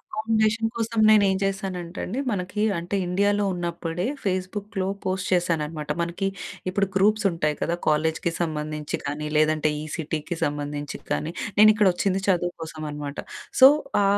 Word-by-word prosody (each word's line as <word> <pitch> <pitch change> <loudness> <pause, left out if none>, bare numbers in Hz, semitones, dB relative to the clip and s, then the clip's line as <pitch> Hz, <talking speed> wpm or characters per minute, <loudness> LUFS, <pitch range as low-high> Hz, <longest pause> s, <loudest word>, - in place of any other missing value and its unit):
Accommodation 220 +1 0
కోసం 230 0 -2
నేను 215 -2 +7
ఏం 190 - +2
చేశానంటే 190 -2 -3
అండి. 230 +8 -4
మనకి 200 +1 -2 0.2
అంటే 175 +4 -3
ఇండియాలో 205 +3 +2
ఉన్నప్పుడే 175 +1 -3 0.2
ఫేస్బుక్‌లో 190 +1 -2 0.2
పోస్ట్ 185 0 -1
చేశాననమాట. 160 -4 0
మనకి 170 +3 -2 0.4
ఇప్పుడు 195 +2 +1
గ్రూప్స్ 210 +2 +3
ఉంటాయి 150 -3 0
కదా! 170 - 0
కాలేజ్‌కి 160 +3 +1
సంబంధించి 150 -2 -2
కానీ, 145 +2 -3
లేదంటే 155 0 +3
ఈ - - -6
సిటీకి 160 +1 -3
సంబంధించి 145 0 -3
కానీ, 160 - -1 0.3
నేను 215 +1 +9
ఇక్కడ 210 -2 +3
వచ్చింది 195 +1 0
చదువు 175 -2 +2
కోసం 155 -1 -6
అనమాట. 145 0 -6 0.4
సో, 265 - +12 0.3
ఆ - - +3
175 Hz, 145 wpm, -25 LUFS, 155-200 Hz, 0.4 s, సో